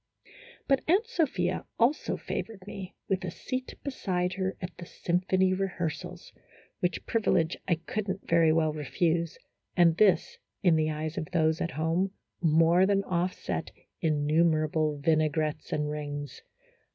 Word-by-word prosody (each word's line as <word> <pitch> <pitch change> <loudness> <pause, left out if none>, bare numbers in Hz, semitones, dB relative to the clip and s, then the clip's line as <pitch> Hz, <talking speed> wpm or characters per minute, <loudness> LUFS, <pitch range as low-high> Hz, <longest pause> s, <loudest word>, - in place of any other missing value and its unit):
But 275 -1 +3
Aunt 380 +7 +4
Sophia 260 - 0
also 250 +6 +2
favored 205 -5 -5
me 195 -2 -8
with 190 -1 0
a 185 - -2
seat 255 +9 -5
beside 185 -10 -1
her 190 0 -2
at 180 -1 -6
the 175 - -7
symphony 185 +2 +1
rehearsals, 180 -2 -4 0.5
which 180 -1 -1
privi 225 -2 +1
lege 165 0 +1
I 175 - +3
could 195 +5 -4
n't 190 +1 -4
very 165 -1 +5
well 155 -1 +2
refuse, 165 +3 0 0.4
and 170 -2 +5
this, 190 -6 +3 0.2
in 175 -4 +5
the 155 0 +2
eyes 155 +1 -3
of 155 - -4
those 160 -2 +2
at 170 - 0
home, 170 +5 0 0.3
more 165 +3 +5
than 195 -1 +2
offset 180 0 -2 0.3
innumerable 155 0 +2
vinaigrettes 155 0 0
and 150 0 0
rings. 145 -1 -5
170 Hz, 140 wpm, -29 LUFS, 155-190 Hz, 0.5 s, very